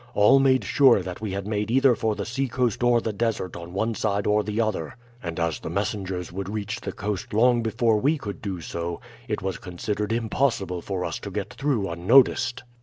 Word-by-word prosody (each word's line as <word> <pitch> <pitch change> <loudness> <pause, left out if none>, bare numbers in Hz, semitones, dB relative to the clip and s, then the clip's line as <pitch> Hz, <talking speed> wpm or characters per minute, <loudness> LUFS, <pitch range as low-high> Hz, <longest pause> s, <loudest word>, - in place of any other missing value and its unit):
All 105 +7 +6
made 130 -1 +3
sure 130 -9 +5
that 90 +2 -7
we 105 -3 -3
had 100 0 -3
made 105 0 -2
either 130 +1 +5
for 110 -2 -1
the - - -4
seacoast 125 -2 -1
or 120 -1 +4
the 110 - -3
desert 105 -4 -2
on 85 0 -8
one 110 +5 -1
side 100 -2 -1
or 105 0 +3
the 105 +2 -3
other, 105 -9 -1 0.3
and 85 -1 -5
as 85 -2 0
the - - -6
messengers 95 -1 -3
would 95 +1 -5
reach 105 0 -4
the 100 - -4
coast 100 +1 -4
long 120 +1 +4
before 115 0 +2
we 145 +7 +2
could 105 -7 -7
do 95 -5 -4
so, 85 +1 -4 0.3
it - - -3
was 95 0 -3
considered 100 +4 -3
impossible 115 -5 0
for 95 -1 -3
us - - -3
to - - -7
get - - -4
through 130 -8 0
unnoticed. 120 +7 +3
105 Hz, 205 wpm, -25 LUFS, 95-120 Hz, 0.3 s, All